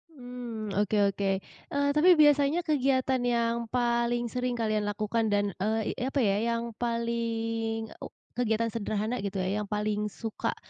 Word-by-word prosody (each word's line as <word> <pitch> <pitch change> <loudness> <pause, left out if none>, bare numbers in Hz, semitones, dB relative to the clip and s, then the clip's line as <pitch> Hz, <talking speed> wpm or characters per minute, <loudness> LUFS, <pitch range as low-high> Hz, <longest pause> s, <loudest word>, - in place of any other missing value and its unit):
Mmm, 245 -4 -6
oke 210 +1 +1
oke. 195 +1 -2 0.4
Eee, 285 0 0
tapi 310 +5 +5
biasanya 295 +2 +4
kegiatan 265 -4 +1
yang 235 -1 +1
paling 240 0 +1
sering 250 -1 -1
kalian 215 -2 0
lakukan 215 +2 0
dan, 205 -1 +1
eee, 220 +2 0
i - - -4
apa 275 +1 -1
ya 200 -1 +2 0.2
yang 230 - -2 0.2
paling 230 -1 -2
u - - -6 0.3
kegiatan 230 -1 +1
sederhana 215 +1 -2
gitu 200 0 -4
ya 195 +3 -1
yang 205 - -5
paling 210 0 -1
suka, 220 +1 -4
230 Hz, 150 wpm, -28 LUFS, 215-245 Hz, 0.4 s, tapi